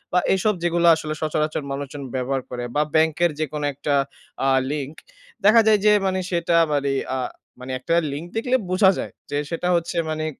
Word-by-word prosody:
বা - - +6 0.2
এসব 210 +3 +1
যেগুলো 170 0 +2
আসলে 155 -1 -4
সচরাচর 155 -1 -1
মানুষজন 140 0 -5
ব্যবহার 130 +1 -1
করে 125 -1 -5
বা 150 - +3
ব্যাংকের 160 +1 +3
যেকোনো 150 -1 -2
একটা 145 +1 -2 0.5
আ - - +3 0.2
লিঙ্ক। 150 0 -4 0.5
দেখা 220 +3 +7
যায় 215 -1 +5
যে 210 - +7
মানে 190 0 0
সেটা 170 -1 +1 0.2
মানে 140 -1 +1 0.2
আ - - -1 0.4
মানে 130 +1 -7
একটা 165 +6 0 0.2
লিঙ্ক 150 +5 -5
দেখলে 250 +3 +1
বোঝা 185 +1 +5
যায় - - -4 0.2
যে 145 - -2
সেটা 170 +1 -2
হচ্ছে 170 +1 -2
মানে 155 0 -2
155 Hz, 180 wpm, -22 LUFS, 145-175 Hz, 0.5 s, দেখা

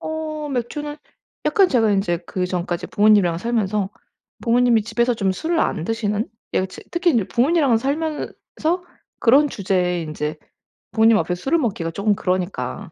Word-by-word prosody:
어 310 -1 -4
맥주는 295 +4 -3 0.5
약간 390 -4 +4
제가 225 -5 +3
인제 175 -4 +1
그전까지 180 -2 -2
부모님이랑 205 -6 +4
살면서 210 -3 -1 0.5
부모님이 240 -1 +3
집에서 235 +2 +1
좀 195 -4 0
술을 325 - -1
안 160 - 0
드시는 220 0 -1 0.3
예. 185 - +2
츠 190 - -12
특히 345 0 +2
이제 225 -6 +2
부모님이랑 275 -1 +3
살면서 300 +5 -2 0.9
그런 280 +5 +5
주제에 180 -5 0
인제 155 0 -4 0.6
부모님 225 0 +5
앞에서 175 +2 -2
술을 325 +5 +2
먹기가 190 - -2
쪼금 205 +3 +1
그러니까 180 -7 -3
220 Hz, 345 characters per minute, -21 LUFS, 185-270 Hz, 0.9 s, 그런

